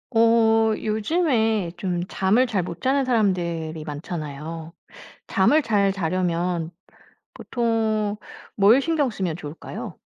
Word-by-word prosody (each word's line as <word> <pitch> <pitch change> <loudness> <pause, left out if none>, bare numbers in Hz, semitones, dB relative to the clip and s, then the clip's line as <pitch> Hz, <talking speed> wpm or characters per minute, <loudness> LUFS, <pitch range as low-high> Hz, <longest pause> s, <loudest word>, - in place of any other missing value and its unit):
어 225 -1 +4
요즘에 220 - 0
좀 175 -1 -2
잠을 210 +9 +2
잘 200 -6 -1
못 170 0 -7
자는 270 +1 +2
사람들이 170 -9 0
많잖아요. 155 +1 -6 0.5
잠을 310 +1 +3
잘 200 -5 +2
자려면 175 -2 -1 0.6
보통 220 -3 -1 0.4
뭘 220 +7 +5
신경 315 -4 +1
쓰면 185 -7 -3
좋을까요? 150 -1 -8
200 Hz, 215 characters per minute, -23 LUFS, 170-225 Hz, 0.6 s, 뭘